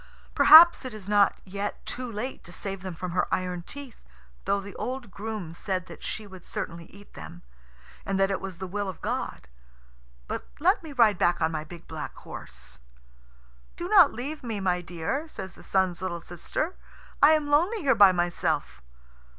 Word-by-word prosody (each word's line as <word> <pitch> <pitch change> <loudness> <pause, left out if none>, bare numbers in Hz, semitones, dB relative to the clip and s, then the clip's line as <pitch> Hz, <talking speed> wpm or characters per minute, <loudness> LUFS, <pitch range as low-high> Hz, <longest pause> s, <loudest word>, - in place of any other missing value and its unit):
"Perhaps 335 +1 +9
it 255 -4 -6
is 200 -3 -9
not 205 -1 +4
yet 200 +2 -5
too 250 -1 -5
late 230 +5 -5
to 175 - -13
save 195 +1 -5
them 185 -2 -6
from 180 +2 -5
her 180 +1 0
iron 180 -1 -1
teeth, 275 +5 -10 0.4
though 200 - +1
the 200 0 -9
old 255 -4 -5
groom 205 -4 -5
said 185 +1 -3
that - - -12
she 215 - -4
would 190 -3 -12
certainly 170 0 -6
eat 200 +4 -17
them, 85 - -10 0.6
and 195 0 -2
that 195 0 +3
it 195 - -2
was 190 -2 -6
the 190 - -5
will 200 +2 -3
of 185 - -8
God. - - -4 0.8
But - - -5
let 375 +6 +3
me 320 -3 -9
ride 225 -8 +4
back 175 0 +2
on 160 0 +1
my 155 -1 -3
big 170 +1 -12
black - - -6
horse." 60 0 -11 1.0
"Do 345 - -5
not 370 -7 +7
leave 295 +5 -5
me, 225 -4 -3
my 180 -2 0
dear," 175 - -3
says 190 - -8
the - - -15
Sun's 185 -2 0
little 180 -2 -3
sister. 175 - -4 0.5
"I 295 +2 +8
am 305 -2 +1
lonely 360 +9 +3
here 270 -2 +4
by 200 -4 +7
myself." 175 - -1
200 Hz, 185 wpm, -27 LUFS, 180-255 Hz, 1.0 s, Perhaps